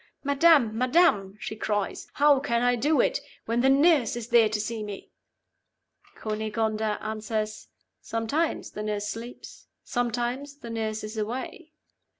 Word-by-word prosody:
'Madam! 280 Hz, -5 st, +4 dB
madam!' 240 Hz, -, +3 dB
she 220 Hz, -, -5 dB
cries; 205 Hz, -2 st, -2 dB
'how 290 Hz, -1 st, +5 dB
can 235 Hz, -4 st, 0 dB
I 245 Hz, 0 st, +3 dB
do 290 Hz, +6 st, +2 dB
it, -, -, +1 dB, 0.3 s
when 230 Hz, +1 st, 0 dB
the 265 Hz, -, +4 dB
nurse 280 Hz, -4 st, +4 dB
is 240 Hz, -1 st, -6 dB
there 235 Hz, -3 st, +5 dB
to 215 Hz, 0 st, -2 dB
see 220 Hz, +1 st, -3 dB
me?' 205 Hz, -2 st, -7 dB, 1.0 s
Cunegonda 215 Hz, 0 st, -1 dB
answers, 215 Hz, 0 st, -3 dB, 0.3 s
'Sometimes 230 Hz, +9 st, -1 dB
the 210 Hz, -, -6 dB
nurse 210 Hz, -1 st, -2 dB
sleeps; 230 Hz, +3 st, -8 dB, 0.2 s
sometimes 245 Hz, +3 st, -2 dB
the 240 Hz, -5 st, -9 dB
nurse 220 Hz, -1 st, -3 dB
is 215 Hz, +1 st, -5 dB
away. 255 Hz, +8 st, -5 dB
230 Hz, 140 wpm, -27 LUFS, 215-265 Hz, 1.0 s, how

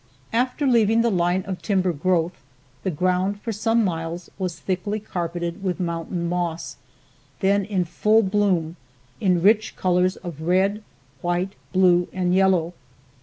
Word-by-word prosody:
After 250 Hz, +5 st, 0 dB
leaving 230 Hz, -3 st, +4 dB
the 235 Hz, 0 st, +2 dB
line 180 Hz, 0 st, +1 dB
of 190 Hz, -2 st, -5 dB
timber 185 Hz, -3 st, +1 dB
growth, 170 Hz, +2 st, 0 dB, 0.4 s
the -, -, -1 dB
ground 185 Hz, +4 st, 0 dB
for 230 Hz, -, -3 dB
some 225 Hz, +2 st, +1 dB
miles 165 Hz, 0 st, -4 dB
was 180 Hz, -3 st, -3 dB
thickly 195 Hz, +4 st, -2 dB
carpeted 175 Hz, -2 st, -4 dB
with 185 Hz, -1 st, -1 dB
mountain 170 Hz, 0 st, -2 dB
moss, 170 Hz, -1 st, -3 dB, 0.6 s
then 200 Hz, +1 st, +2 dB
in 190 Hz, -3 st, 0 dB
full 215 Hz, +6 st, +3 dB
bloom 190 Hz, -5 st, +1 dB, 0.4 s
in 180 Hz, -3 st, +2 dB
rich 215 Hz, +2 st, +3 dB
colors 185 Hz, 0 st, +2 dB
of 170 Hz, -5 st, -8 dB
red, 190 Hz, +5 st, +1 dB, 0.4 s
white, 175 Hz, +2 st, -1 dB, 0.2 s
blue 180 Hz, -2 st, +4 dB
and 180 Hz, -1 st, 0 dB
yellow. 185 Hz, -3 st, +3 dB
185 Hz, 140 wpm, -23 LUFS, 175-200 Hz, 0.6 s, leaving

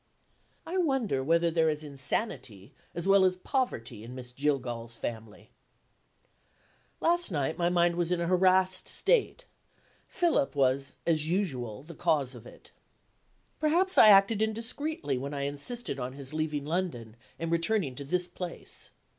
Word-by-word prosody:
I 355 Hz, +3 st, -3 dB
wonder 270 Hz, -, +1 dB
whether 165 Hz, +3 st, +2 dB
there 160 Hz, -1 st, +3 dB
is 150 Hz, 0 st, -2 dB
insanity 135 Hz, -, -4 dB, 0.2 s
(as 170 Hz, +2 st, -3 dB
well 195 Hz, 0 st, +6 dB
as 185 Hz, -1 st, +2 dB
poverty) 185 Hz, -, -2 dB
in 120 Hz, +2 st, -9 dB
Miss 125 Hz, -1 st, -8 dB
Jillgall's 125 Hz, -4 st, -2 dB
family? 110 Hz, -2 st, -7 dB, 1.5 s
Last 345 Hz, -2 st, +2 dB
night 150 Hz, -3 st, -1 dB
my 175 Hz, 0 st, +1 dB
mind 175 Hz, -1 st, +2 dB
was 175 Hz, 0 st, 0 dB
in 180 Hz, -, +1 dB
a 170 Hz, -, -1 dB
harassed 185 Hz, +1 st, +3 dB
state. -, -, +1 dB, 0.6 s
Philip 335 Hz, -, +1 dB
was, 135 Hz, 0 st, +1 dB
as 155 Hz, -2 st, +1 dB
usual, 130 Hz, -, -2 dB
the 170 Hz, +3 st, -11 dB
cause 150 Hz, -5 st, 0 dB
of 120 Hz, -1 st, -12 dB
it. -, -, -16 dB, 0.9 s
Perhaps 350 Hz, +5 st, +3 dB
I -, -, +9 dB
acted 200 Hz, +1 st, +6 dB
indiscreetly 230 Hz, -, -1 dB
when 140 Hz, +2 st, -5 dB
I 140 Hz, -, -3 dB
insisted 145 Hz, -, -2 dB
on 125 Hz, +1 st, -4 dB
his 140 Hz, +1 st, -8 dB
leaving 155 Hz, -2 st, -2 dB
London, 150 Hz, -10 st, -3 dB, 0.2 s
and 165 Hz, 0 st, -3 dB
returning 170 Hz, -3 st, +1 dB
to 140 Hz, -, -8 dB
this 180 Hz, +5 st, -1 dB
place. 180 Hz, -2 st, -6 dB
165 Hz, 145 wpm, -29 LUFS, 135-195 Hz, 1.5 s, I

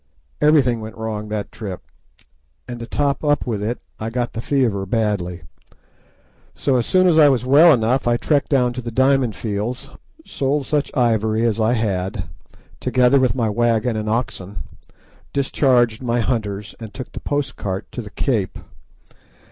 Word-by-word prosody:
Everything 135 Hz, -6 st, +4 dB
went 110 Hz, +1 st, -8 dB
wrong 110 Hz, -1 st, -4 dB
that 105 Hz, -1 st, -4 dB
trip, 100 Hz, -5 st, -7 dB, 0.8 s
and 120 Hz, -1 st, -6 dB
to 115 Hz, -, -7 dB
top 140 Hz, +1 st, -1 dB
up 145 Hz, -1 st, +1 dB
with 115 Hz, 0 st, -2 dB, 0.2 s
I 110 Hz, -, -3 dB
got 120 Hz, +1 st, -2 dB
the 115 Hz, -, -4 dB
fever 115 Hz, -9 st, 0 dB
badly. 95 Hz, -6 st, -1 dB, 1.1 s
So 130 Hz, -3 st, +1 dB
soon 185 Hz, +10 st, +3 dB
as 165 Hz, -3 st, +5 dB
I 150 Hz, -2 st, +8 dB
was 125 Hz, -2 st, +1 dB
well 150 Hz, +6 st, +7 dB
enough 125 Hz, 0 st, +2 dB
I 120 Hz, 0 st, +3 dB
trekked 145 Hz, +2 st, 0 dB
down 125 Hz, -4 st, +2 dB
to 125 Hz, -, -5 dB
the 120 Hz, -, -5 dB
Diamond 130 Hz, -1 st, +2 dB
Fields, 115 Hz, +6 st, -4 dB, 0.3 s
sold 140 Hz, +1 st, -1 dB
such 150 Hz, 0 st, 0 dB
ivory 110 Hz, -2 st, +2 dB
as 115 Hz, -1 st, 0 dB
I 110 Hz, +2 st, +2 dB
had, 100 Hz, -3 st, -1 dB, 0.6 s
together 125 Hz, +2 st, +3 dB
with 130 Hz, -4 st, +2 dB
my 115 Hz, -4 st, 0 dB
wagon 115 Hz, +1 st, +1 dB
and 110 Hz, 0 st, -2 dB
oxen, 105 Hz, -4 st, -3 dB, 0.7 s
discharged 130 Hz, -4 st, +2 dB
my 120 Hz, -1 st, 0 dB
hunters, 105 Hz, -4 st, -2 dB
and 110 Hz, -2 st, -8 dB
took 130 Hz, -, -8 dB
the -, -, -7 dB
post 145 Hz, -1 st, -2 dB
cart 95 Hz, 0 st, -4 dB
to 125 Hz, -, -5 dB
the 105 Hz, -, -9 dB
Cape. 110 Hz, -4 st, -1 dB
120 Hz, 160 wpm, -20 LUFS, 110-130 Hz, 1.1 s, I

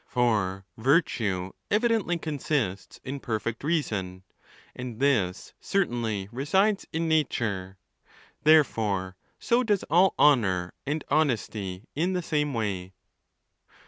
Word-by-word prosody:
For 105 Hz, -7 st, 0 dB
virtue. 110 Hz, -, +1 dB, 0.2 s
evidently 215 Hz, -5 st, +2 dB
con 155 Hz, -3 st, -4 dB
sists 100 Hz, -13 st, -2 dB
in 140 Hz, +2 st, -5 dB
perfect 115 Hz, -1 st, -3 dB
reason, 105 Hz, -, -2 dB, 0.5 s
and 125 Hz, -2 st, -7 dB
this 110 Hz, -10 st, +1 dB
certainly 115 Hz, -, -1 dB
resides 190 Hz, -, +1 dB
in 165 Hz, +1 st, -1 dB
nature. 105 Hz, -11 st, 0 dB, 0.7 s
Therefore 110 Hz, -12 st, +3 dB, 0.2 s
so 235 Hz, +1 st, +2 dB
does 210 Hz, -5 st, +1 dB
all 180 Hz, +3 st, +5 dB
honour 95 Hz, -11 st, +3 dB
and 150 Hz, +1 st, -1 dB
honesty 110 Hz, -10 st, 0 dB
in 175 Hz, +6 st, 0 dB
the 180 Hz, -1 st, -1 dB
same 150 Hz, -2 st, 0 dB
way. 100 Hz, -6 st, -3 dB
125 Hz, 110 wpm, -27 LUFS, 100-160 Hz, 0.7 s, all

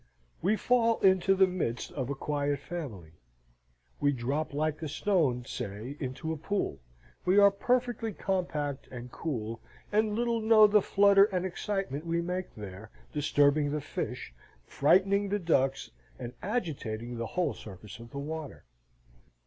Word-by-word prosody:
We 195 Hz, +6 st, +3 dB
fall 230 Hz, 0 st, +2 dB
into 190 Hz, 0 st, +4 dB
the 190 Hz, 0 st, +6 dB
midst 180 Hz, -10 st, -3 dB
of 130 Hz, -2 st, -4 dB
a 140 Hz, -, -2 dB
quiet 145 Hz, 0 st, -1 dB
family: 135 Hz, -, -7 dB, 0.9 s
we 145 Hz, -, +3 dB
drop 140 Hz, +5 st, -2 dB
like 155 Hz, +2 st, -1 dB
a 160 Hz, -, -3 dB
stone, 145 Hz, -7 st, +1 dB
say, 105 Hz, +8 st, -5 dB
into 135 Hz, +4 st, -4 dB
a -, -, -5 dB
pool, 160 Hz, -, -2 dB, 0.4 s
we 185 Hz, +2 st, +3 dB
are 200 Hz, 0 st, +8 dB
perfectly 240 Hz, +1 st, 0 dB
compact 155 Hz, -9 st, -2 dB
and 125 Hz, 0 st, -8 dB
cool, 115 Hz, -8 st, -4 dB, 0.3 s
and 210 Hz, 0 st, +2 dB
little 235 Hz, 0 st, 0 dB
know 220 Hz, -1 st, +7 dB
the 210 Hz, 0 st, +5 dB
flutter 200 Hz, 0 st, +5 dB
and 185 Hz, -3 st, -2 dB
excitement 185 Hz, -5 st, -3 dB
we 170 Hz, 0 st, +1 dB
make 180 Hz, +2 st, -3 dB
there, 105 Hz, 0 st, -9 dB, 0.2 s
disturbing 145 Hz, 0 st, +3 dB
the 150 Hz, +1 st, -1 dB
fish, 130 Hz, -, -5 dB, 0.3 s
frightening 195 Hz, -, +3 dB
the 205 Hz, -, +1 dB
ducks, 135 Hz, -7 st, +1 dB, 0.3 s
and 125 Hz, -1 st, -6 dB
agitating 125 Hz, -, -3 dB
the 115 Hz, -, -2 dB
whole 175 Hz, -5 st, +2 dB
surface 105 Hz, +3 st, -11 dB
of 115 Hz, 0 st, -11 dB
the 140 Hz, -, -8 dB
water. 155 Hz, +1 st, -6 dB
155 Hz, 150 wpm, -30 LUFS, 130-195 Hz, 0.9 s, are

